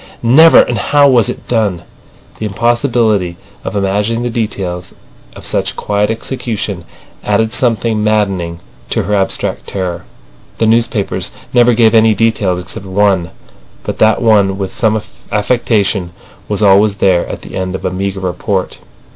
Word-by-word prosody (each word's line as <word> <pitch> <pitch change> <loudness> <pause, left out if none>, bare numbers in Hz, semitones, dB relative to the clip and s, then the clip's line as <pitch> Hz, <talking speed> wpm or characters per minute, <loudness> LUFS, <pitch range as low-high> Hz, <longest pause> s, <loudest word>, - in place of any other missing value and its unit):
Never! 155 +8 +7
And 120 -3 -2
how 145 +6 +4
was 120 -6 +3
it - - -7
done? 105 -7 0 0.6
The 110 - -2
impossibility 110 -4 0 0.3
of - - -5
imagining 105 +4 0
the 120 - -2
details 95 -6 -4 0.4
of - - -11
such - - -1
quiet 105 0 -1
execution 110 -5 -4 0.4
added 110 +2 0
something 115 -3 +1
maddening 95 -6 -1 0.3
to - - 0
her 105 - -2
abstract 95 -2 -2
terror. 90 -2 -4 0.5
The 115 - +1
newspapers 115 -2 0 0.2
never 120 -1 +4
gave 110 -1 +4
any 110 -1 +4
details 100 -4 0
except 95 +2 -8
one, 95 -3 +1 0.5
but - - -5
that 110 +2 +3
one 100 -4 +3
with 95 -1 -4
some 110 -1 +1 0.3
affectation 105 -5 0 0.3
was 105 0 -1
always 100 +1 +4
there 95 -3 +2
at - - -7
the - - -11
end 95 0 -3
of - - -6
a - - 0
meagre 95 +1 -3
report. 95 +1 -2
105 Hz, 145 wpm, -14 LUFS, 95-115 Hz, 0.6 s, Never